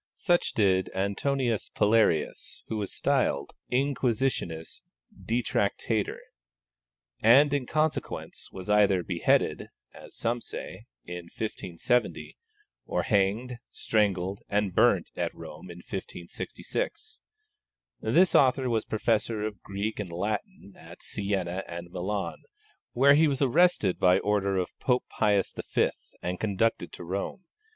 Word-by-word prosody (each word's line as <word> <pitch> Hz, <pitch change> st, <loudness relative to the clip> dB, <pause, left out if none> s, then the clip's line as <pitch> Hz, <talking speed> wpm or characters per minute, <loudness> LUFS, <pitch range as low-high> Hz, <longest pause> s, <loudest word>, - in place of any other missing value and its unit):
Such 175 Hz, -2 st, +1 dB
did 95 Hz, -3 st, +2 dB
Antonius 115 Hz, +4 st, 0 dB
Palearius, 105 Hz, -7 st, +1 dB
who 110 Hz, -, -2 dB
was 100 Hz, -2 st, -3 dB
styled 70 Hz, +1 st, 0 dB, 0.2 s
Inquisitionis 125 Hz, -, -1 dB, 0.3 s
Detractator, 110 Hz, -2 st, -1 dB, 1.0 s
and 135 Hz, +6 st, +6 dB
in 135 Hz, -4 st, 0 dB
consequence 155 Hz, 0 st, -2 dB
was 95 Hz, -1 st, -8 dB
either 100 Hz, -3 st, +4 dB
beheaded 85 Hz, -2 st, +1 dB, 0.3 s
(as -, -, -13 dB
some 120 Hz, +1 st, -1 dB
say) -, -, -7 dB, 0.2 s
in 90 Hz, 0 st, -7 dB
1570, 105 Hz, +3 st, -2 dB, 0.5 s
or -, -, 0 dB
hanged, 110 Hz, +5 st, +1 dB
strangled, 100 Hz, -3 st, 0 dB
and 100 Hz, -2 st, 0 dB
burnt -, -, +3 dB
at -, -, -2 dB
Rome -, -, -10 dB
in 85 Hz, -, -9 dB
1566. 125 Hz, -, -5 dB, 0.8 s
This 185 Hz, +1 st, +3 dB
author 130 Hz, -2 st, +4 dB
was 110 Hz, -2 st, 0 dB
Professor 110 Hz, 0 st, 0 dB
of 105 Hz, -4 st, -4 dB
Greek 100 Hz, +3 st, -4 dB
and 100 Hz, -3 st, -4 dB
Latin 100 Hz, -, -4 dB
at -, -, -13 dB
Sienna 95 Hz, -2 st, -2 dB
and 85 Hz, 0 st, -7 dB
Milan, 95 Hz, +3 st, -3 dB, 0.5 s
where 140 Hz, +3 st, +6 dB
he 155 Hz, +2 st, +5 dB
was 140 Hz, -2 st, 0 dB
arrested 135 Hz, -, +3 dB
by 90 Hz, 0 st, +5 dB
order 100 Hz, -1 st, +1 dB
of 90 Hz, -, -1 dB
Pope 125 Hz, -1 st, +1 dB
Pius 105 Hz, -3 st, +1 dB, 0.2 s
V. -, -, +4 dB, 0.3 s
and 90 Hz, +1 st, -2 dB
conducted 110 Hz, -2 st, 0 dB
to -, -, -8 dB
Rome. 95 Hz, -, -4 dB
105 Hz, 120 wpm, -28 LUFS, 95-125 Hz, 1.0 s, and